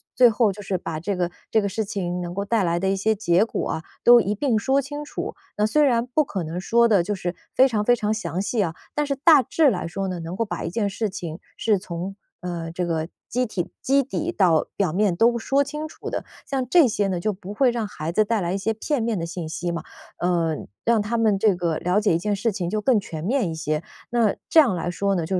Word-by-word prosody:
最 250 -1 +7
后 220 -1 +2
就 205 - -10
是 195 0 -2
把 155 -1 -4
这 195 +4 -2
个 175 -1 0 0.2
这 220 - +4
个 200 - -1
事 220 +3 -2
情 180 -3 -3
能 175 0 -5
够 200 +2 -2
带 220 0 +1
来 170 -1 +1
的 190 +2 0
一 195 - +2
些 215 +3 +1
结 195 -1 +2
果 - - -3
啊， 160 - -3 0.2
都 240 0 +8
一 205 -2 0
并 235 +1 +1
说 265 +6 +2
清 290 +2 -6
楚。 - - -5 0.2
那 210 0 +3
虽 300 +8 +3
然 240 -4 +2
不 280 +5 +2
可 190 -9 -4
能 165 +3 -4
说 235 +4 +3
得 200 -6 +4
就 205 - -2
是 180 -2 -4 0.2
非 260 - +6
常 215 -5 -1
非 245 - +5
常 215 -2 -1
详 180 -5 -2
细 220 +3 -2
啊， 165 -3 -2 0.2
但 295 0 +1
是 280 - -1
大 295 -1 +6
致 310 +5 +3
来 185 -7 -2
说 195 +3 -3
呢， 180 -2 -4
能 165 +2 -5
够 230 - 0
把 210 - -5
一 - - -2
件 205 +1 0
事 210 +2 -2
情 170 -4 -6 0.2
是 215 -2 +2
从， 180 +1 -6 0.3
呃， 170 -2 -4
这 175 +1 -2
个 160 -2 -1 0.2
基 250 +1 0
体 185 -6 -3
基 275 +1 +3
底 315 +6 -3
到 175 - +3
表 185 -6 +1
面 200 -1 +2
都 235 +5 +3
说 275 +5 +2
清 300 +2 -5
楚 - - -8
的。 - - -3 0.2
像 265 -2 -2
这 335 -5 +6
些 205 -2 0
呢， 180 -2 -1
就 215 +4 -1
不 195 +1 -9
会 260 +2 +4
让 235 -2 -2
孩 160 -4 -5
子 215 - +4
带 220 +1 0
来 175 -1 -1
一 - - 0
些 210 +3 -1
片 260 +5 -1
面 225 -2 0
的 165 - -2
信 170 -1 -5
息 175 +2 -3
嘛， 170 - -4 0.4
呃， 170 -3 +1 0.3
让 230 -2 +3
他 220 +3 -1
们 220 -3 +3
这 210 -1 +4
个， 170 -3 -1
了 180 +4 +1
解 210 -4 +2
一 - - +1
件 205 +4 -1
事 220 +3 0
情 180 -3 -3
就 215 - -1
更 255 0 +3
全 160 -5 -7
面 230 -1 +1
一 160 - -4
些。 155 0 -2 0.3
那 230 -4 +2
这 325 - +6
样 255 -11 +5
来 175 0 -2
说 200 +2 0
呢， 170 -3 -1
就 185 +3 -1
205 Hz, 285 characters per minute, -23 LUFS, 175-235 Hz, 0.4 s, 都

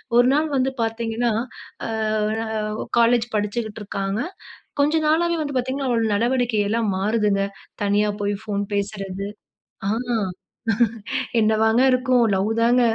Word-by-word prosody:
ஒரு 245 +1 +6
நாள் 305 +2 +2
வந்து 265 0 +2
பார்த்தீங்கன்னா. 225 +1 0 0.6
அ, - - -4 0.6
அ, - - -5 0.4
ஒ - - -9
காலேஜ் 235 0 +4
படிச்சுக்கிட்டு 210 +1 -2
இருக்காங்க. 195 0 -2 0.6
கொஞ்ச 295 +2 +3
நாளாவே 340 +2 +2
வந்து 285 -2 -4
பார்த்தீங்கன்னா, 260 +2 -1
அவளோட 230 -2 +2
நடவடிக்கை 240 0 +1
எல்லாம் 220 -2 +1
மாறுதுங்க. 205 0 +1 0.4
தனியா 205 +1 +2
போய் 205 0 0
ஃபோன் 205 -2 -2
பேசறது. 200 -1 -3 0.6
ஆ - - +1 1.5
என்னவாங்க 220 +2 +3
இருக்கும்? 255 -1 +3
லவ் 195 +2 +1
தாங்க! 240 +2 +4
225 Hz, 125 wpm, -23 LUFS, 205-245 Hz, 1.5 s, ஒரு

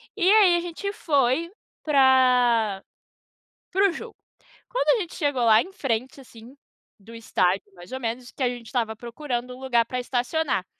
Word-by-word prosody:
E 400 - -3
aí 400 -5 +6
a - - +1
gente 350 +4 -5
foi 290 0 0 0.3
para, 250 -7 +3 0.9
para 390 +1 +3
o - - -2
jogo. 460 +6 -9 0.5
Quando - - +2
a - - -2
gente 345 - -7
chegou 285 -6 0
lá 220 0 +6
em 380 - -8
frente 260 -3 -3
assim, 235 +1 -15 0.4
do 225 +4 -14
estádio 195 -4 0
mais 175 0 -14
ou 260 - -4
menos 245 +1 -5
que - - -13
a 250 - +2
gente 245 -1 -7
estava 225 -2 -2
procurando 245 +1 -5
um - - -14
lugar 240 -3 +2
para 250 +1 -4
estacionar. 250 - -1
255 Hz, 170 wpm, -24 LUFS, 230-310 Hz, 0.9 s, aí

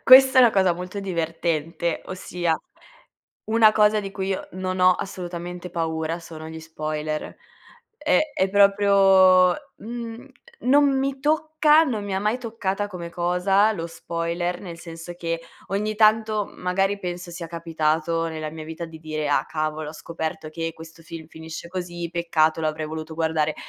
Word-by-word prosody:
Questa 260 0 +9
è - - +10
una 240 - +7
cosa 190 -3 +3
molto 180 +3 -6
divertente, 165 -2 -2
ossia 175 -3 -2 0.9
una 220 -1 +5
cosa 210 0 +4
di 195 -1 -6
cui 190 -1 -3
io 195 - -3
non 185 0 -3
ho 185 0 +7
assolutamente 180 -1 -6
paura 160 -1 -2
sono 160 -1 -9
gli 160 0 -8
spoiler. 155 -1 -4 0.6
È - - +2 0.2
è 190 - +2
proprio 195 -2 +6 0.2
mhmm, 235 +2 -7 0.3
non 275 +1 +4
mi 270 0 -1
tocca, 310 +1 +4
non 220 -8 -2
mi 200 -1 -3
ha - - +1
mai 210 +4 0
toccata 210 -4 -2
come 180 -4 -7
cosa 180 +5 +2
lo 170 -5 -4
spoiler, 170 +1 -3
nel 170 -3 -8
senso 165 +1 -9
che 165 -1 -3 0.3
ogni 210 +3 -1
tanto 215 -1 +3
m - - -16
magari 195 +2 +1
penso 180 -1 -5
sia 170 0 -6
capitato 165 0 0
nella 155 -1 -5
mia 160 0 -8
vita 160 +2 -6
di 160 -1 -11
dire: 155 -1 -3
"Ah, 145 - +2
cavolo, 155 -1 -3
ho - - -10
scoperto 160 0 -5
che 165 +1 -3
questo 160 0 -13
film 165 -1 -9
finisce 160 +1 -8
così, 175 -1 -5
peccato 165 -2 +1
l'avrei 155 0 -2
voluto 160 +1 -6
guardare", 160 -1 0
175 Hz, 160 wpm, -24 LUFS, 160-200 Hz, 0.9 s, è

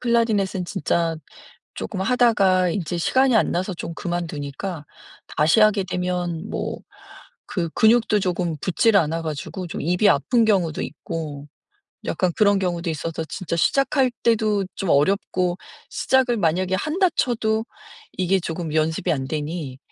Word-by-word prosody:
클라리넷은 220 -6 +1
진짜 170 -3 -1 0.6
쪼끔 195 -3 -5
하다가 195 -6 +3
인제 175 -1 -2
시간이 260 +7 +3
안 220 - +3
나서 185 +2 -1
좀 170 -1 -6
그만두니까 170 -1 -4 0.5
다시 155 +8 +4
하게 215 -2 +4
되면 180 -1 -3
뭐 - - -3 0.7
그 170 -3 -2
근육도 220 0 +4
조금 175 -4 -1
붙지를 200 +3 +3
않아 165 0 -1
가지고 160 +4 -5
좀 - - -6
입이 180 +6 +3
아픈 230 - +3
경우도 180 -7 +1
있고 150 -2 -6 0.6
약간 185 -2 0
그런 205 -2 +4
경우도 175 -2 -2
있어서 160 +1 -4
진짜 185 -3 -4
시작할 270 - +2
때도 215 -3 +2
좀 195 - -3
어렵고 180 +3 +1 0.3
시작을 260 -2 +2
만약에 185 +1 +1
한다 330 - +1
쳐도 220 -3 0 0.5
이게 185 +1 +1
조금 165 -2 -4
연습이 160 +2 +1
안 135 -3 -2
되니 150 -3 -4
180 Hz, 295 characters per minute, -22 LUFS, 165-215 Hz, 0.7 s, 다시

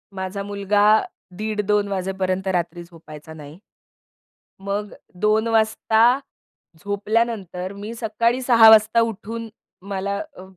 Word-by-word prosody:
माझा 190 +1 -4
मुलगा 205 0 0 0.5
दीड 215 0 -2
2:00 210 -1 +2
वाजेपर्यंत 190 0 -2
रात्री 175 -1 -3
झोपायचा 160 -2 -13
नाही. 150 +1 -12 1.0
मग 200 +1 -4 0.3
2 215 +2 +2
वाजता 225 +2 +3 0.7
झोपल्यानंतर 200 -3 -2
मी 205 +3 -7
सकाळी 230 +3 0
06:00 230 -3 +7
वाजता 220 +1 +6
उठून 225 +1 -4 0.4
मला 200 +1 -2 0.2
अ, 185 - -10
205 Hz, 110 wpm, -22 LUFS, 190-220 Hz, 1.0 s, 06:00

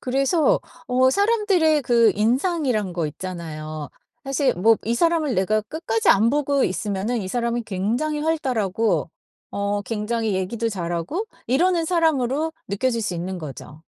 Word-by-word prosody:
그래서 275 +5 +2 0.3
어 260 0 +3
사람들의 395 - +2
그 235 -2 +4
인상이란 245 - 0
거 170 -3 -1
있잖아요. 155 -3 -6 0.4
사실 275 0 +1
뭐 220 +5 +4
이 230 +2 0
사람을 320 -3 +1
내가 215 +3 +2
끝까지 225 -2 -2
안 220 +4 +5
보고 285 -1 +1
있으면은 205 +4 -2
이 185 - -5
사람은 235 +1 -1
굉장히 235 +11 -1
활달하고 230 - 0 0.4
어 200 0 -1
굉장히 220 0 -2
얘기도 220 +5 -1
잘하고 175 - -3 0.2
이러는 335 +6 +2
사람으로 315 -3 +1 0.2
느껴질 230 +4 0
수 190 - -2
있는 180 +2 -4
거죠. 150 0 -9
230 Hz, 315 characters per minute, -23 LUFS, 195-295 Hz, 0.4 s, 안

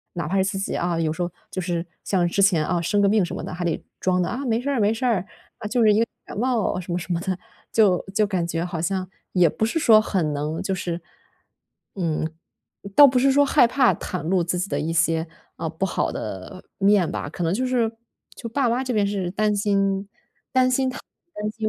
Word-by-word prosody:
哪 170 - -3
怕 195 - 0
是 190 - +4
自 195 0 -2
己 195 - -2
啊， 170 -1 -1
有 160 -1 +1
时 160 - -4
候 175 0 -1 0.2
就 185 - -4
是 170 -1 -2 0.2
像 180 -3 +1
之 185 +3 0
前 180 -6 +4
啊， 175 -2 0
生 190 +5 +1
个 200 - +4
病 210 0 +3
什 - - -6
么 - - -5
的 - - -6
还 175 0 -4
得 170 -2 -1 0.2
装 180 -1 +1
得， 175 - -1
啊， 270 +4 -4
没 230 -2 +1
事 280 - -3
儿， 275 -4 0
没 210 +1 +3
事 225 +3 -3
儿， 215 -7 +1 0.3
啊， - - -5
就 240 +3 +1
是 215 -2 +6
一 210 - +3
个 230 - +3 0.2
感 - - -8
冒， 235 -5 0
什 180 -1 -7
么 175 - 0
什 180 - -7
么 170 - 0
的， 190 -1 -2 0.3
就 200 -5 +3
就 215 +1 +3
感 185 -4 -1
觉 170 0 -2
好 170 -2 -4
像 185 +1 -2 0.2
也 180 -2 +4
不 220 - -1
是 240 +9 -1
说 220 -7 +6
很 175 -8 -1
能 150 +3 -3
就 190 0 -1
是， 175 -1 -4 0.9
嗯， 160 -4 -1 0.7
倒 290 - +10
不 255 -1 +1
是 270 +2 +4
说 285 +1 +4
害 270 - +5
怕 255 +1 +3
袒 180 - -5
露 175 +2 +1
自 175 +1 -1
己 180 - -1
的 145 - -1
一 155 +3 -2
些， 165 0 +1 0.3
呃， - - -3
不 - - -2
好 - - -1
的 95 - -7
面 195 -3 +3
吧， - - -4
可 160 - -8
能 165 +1 +1
就 255 +6 0
是 245 -3 +1 0.5
就 230 - -7
爸 260 +2 +1
妈 240 +3 +1
这 255 -1 -2
边 205 -2 +2
是 195 -3 -2
担 210 +2 +1
心 195 -1 +1 1.3
担 210 0 -3
心 220 0 -3
195 Hz, 255 characters per minute, -23 LUFS, 175-220 Hz, 1.3 s, 倒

